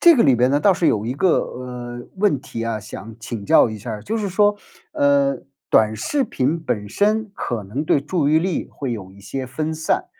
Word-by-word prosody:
这 340 Hz, -4 st, +8 dB
个 230 Hz, -, +5 dB
里 130 Hz, -, +5 dB
边 125 Hz, +2 st, +3 dB
呢， 145 Hz, -, +3 dB
倒 190 Hz, +5 st, +4 dB
是 170 Hz, -, +1 dB
有 105 Hz, +1 st, 0 dB
一 125 Hz, -, -2 dB
个， 175 Hz, +4 st, +3 dB
呃， 120 Hz, -1 st, -6 dB
问 185 Hz, -9 st, +2 dB
题 115 Hz, -5 st, -6 dB
啊， 110 Hz, -2 st, -2 dB
想 110 Hz, +1 st, -9 dB
请 115 Hz, -3 st, -6 dB
教 -, -, +5 dB
一 110 Hz, -, -6 dB
下 115 Hz, +3 st, -7 dB
儿。 105 Hz, -, -6 dB
就 225 Hz, +2 st, -2 dB
是 205 Hz, -2 st, -2 dB
说， 205 Hz, +2 st, +3 dB, 0.4 s
呃， 140 Hz, -1 st, +3 dB, 0.3 s
短 110 Hz, 0 st, +4 dB
视 270 Hz, -, 0 dB
频 145 Hz, +6 st, -1 dB
本 105 Hz, -9 st, -3 dB
身 215 Hz, -, +1 dB
可 115 Hz, -4 st, -3 dB
能 120 Hz, +11 st, -4 dB
对 145 Hz, -, +3 dB
注 150 Hz, 0 st, 0 dB
意 155 Hz, +1 st, +4 dB
力 180 Hz, -1 st, -2 dB
会 135 Hz, -3 st, -4 dB
有 95 Hz, -5 st, -6 dB
一 100 Hz, -, -16 dB
些 130 Hz, +6 st, -5 dB
分 155 Hz, +5 st, -3 dB
散， 160 Hz, 0 st, -1 dB
135 Hz, 240 characters per minute, -21 LUFS, 115-170 Hz, 0.4 s, 这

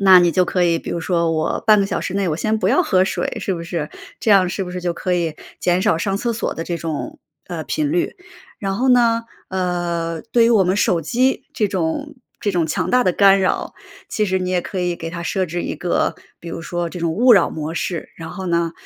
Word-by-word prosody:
那 190 Hz, -2 st, +8 dB
你 175 Hz, -1 st, +3 dB
就 180 Hz, +3 st, +3 dB
可 180 Hz, 0 st, +1 dB
以 170 Hz, -1 st, +2 dB
比 -, -, -7 dB
如 170 Hz, -, -2 dB
说 170 Hz, -1 st, +1 dB
我 155 Hz, -1 st, -1 dB
半 215 Hz, -2 st, +6 dB
个 195 Hz, -, +1 dB
小 -, -, -2 dB
时 -, -, -4 dB
内 195 Hz, -2 st, 0 dB
我 155 Hz, -, -1 dB
先 220 Hz, +5 st, 0 dB
不 185 Hz, -, +1 dB
要 275 Hz, -, +4 dB
喝 185 Hz, -, +3 dB
水， -, -, -2 dB
是 190 Hz, -, -1 dB
不 170 Hz, -, -5 dB
是？ 165 Hz, -3 st, -3 dB, 0.3 s
这 225 Hz, -, +1 dB
样 190 Hz, -3 st, +6 dB
是 195 Hz, +2 st, -3 dB
不 180 Hz, -, -7 dB
是 180 Hz, -, -4 dB
就 175 Hz, -1 st, -1 dB
可 180 Hz, +1 st, -1 dB
以 165 Hz, -3 st, -1 dB, 0.2 s
减 175 Hz, 0 st, +2 dB
少 210 Hz, -5 st, +3 dB
上 195 Hz, +3 st, -1 dB
厕 235 Hz, +3 st, -1 dB
所 230 Hz, -, -2 dB
的 165 Hz, -, -4 dB
这 170 Hz, -, -2 dB
种， 165 Hz, -3 st, -5 dB, 0.3 s
呃， 170 Hz, -3 st, -4 dB
频 300 Hz, -2 st, -1 dB
率。 350 Hz, +2 st, 0 dB, 0.4 s
然 195 Hz, -1 st, -2 dB
后 255 Hz, +5 st, +1 dB
呢， 235 Hz, -2 st, +4 dB, 0.3 s
呃， 175 Hz, -3 st, -2 dB
对 235 Hz, -1 st, +5 dB
于 230 Hz, -, +4 dB
我 215 Hz, -5 st, +5 dB
们 180 Hz, +1 st, +2 dB
手 195 Hz, -5 st, +2 dB
机 250 Hz, -, +1 dB
这 210 Hz, -, +1 dB
种 195 Hz, -, -2 dB, 0.2 s
这 205 Hz, -, 0 dB
种 175 Hz, -3 st, +1 dB
强 155 Hz, -, -1 dB
大 250 Hz, 0 st, +4 dB
的 185 Hz, -, +3 dB
干 195 Hz, +1 st, +6 dB
扰， 185 Hz, -, -1 dB, 0.3 s
其 215 Hz, -, 0 dB
实 190 Hz, -1 st, +1 dB
你 185 Hz, 0 st, -2 dB
也 180 Hz, -1 st, +1 dB
可 185 Hz, +2 st, -4 dB
以 175 Hz, -1 st, -1 dB
给 165 Hz, 0 st, -6 dB
它 170 Hz, 0 st, -5 dB
设 185 Hz, +2 st, -1 dB
置 175 Hz, +1 st, -3 dB
一 -, -, -3 dB
个 170 Hz, +3 st, 0 dB, 0.2 s
比 170 Hz, -, -9 dB
如 165 Hz, -, -5 dB
说 175 Hz, +1 st, -3 dB
这 180 Hz, -, -7 dB
种 165 Hz, -1 st, 0 dB
勿 245 Hz, +8 st, +5 dB
扰 195 Hz, -, +4 dB
模 155 Hz, +1 st, -4 dB
式， 175 Hz, -1 st, -3 dB
然 160 Hz, -1 st, -7 dB
后 190 Hz, -2 st, -6 dB
呢， 170 Hz, -1 st, 0 dB
180 Hz, 270 characters per minute, -20 LUFS, 170-205 Hz, 0.4 s, 那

